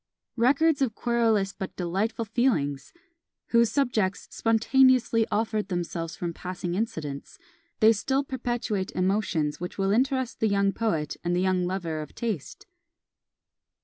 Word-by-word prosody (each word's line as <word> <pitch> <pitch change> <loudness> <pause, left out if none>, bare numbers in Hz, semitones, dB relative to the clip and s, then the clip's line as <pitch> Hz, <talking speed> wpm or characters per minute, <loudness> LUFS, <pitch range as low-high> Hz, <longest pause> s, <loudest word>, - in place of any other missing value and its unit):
Records 280 +5 +3
of 240 -5 +1
querulous 225 -5 +1
but 190 - -6
delightful 195 +6 -1
feelings! 200 - 0 0.6
whose 235 -1 +4
subjects 230 -9 0
spontaneously 230 0 +3
offered 215 -1 -1
themselves 170 -2 -3
from 170 -1 -4
passing 180 0 -5
incidents; 160 -9 -4 0.4
they 220 +1 +7
still 265 +6 0
perpetuate 240 -7 -2
emotions 185 -6 0
which 180 +1 -6
will 195 0 +1
interest 260 +2 0
the 220 - +2
young 200 -1 +2
poet 160 -10 -1
and 175 0 0
the - - +1
young 185 -1 +1
lover 170 -4 -3
of 150 - -10
taste. 220 - -4
210 Hz, 130 wpm, -26 LUFS, 180-235 Hz, 0.6 s, they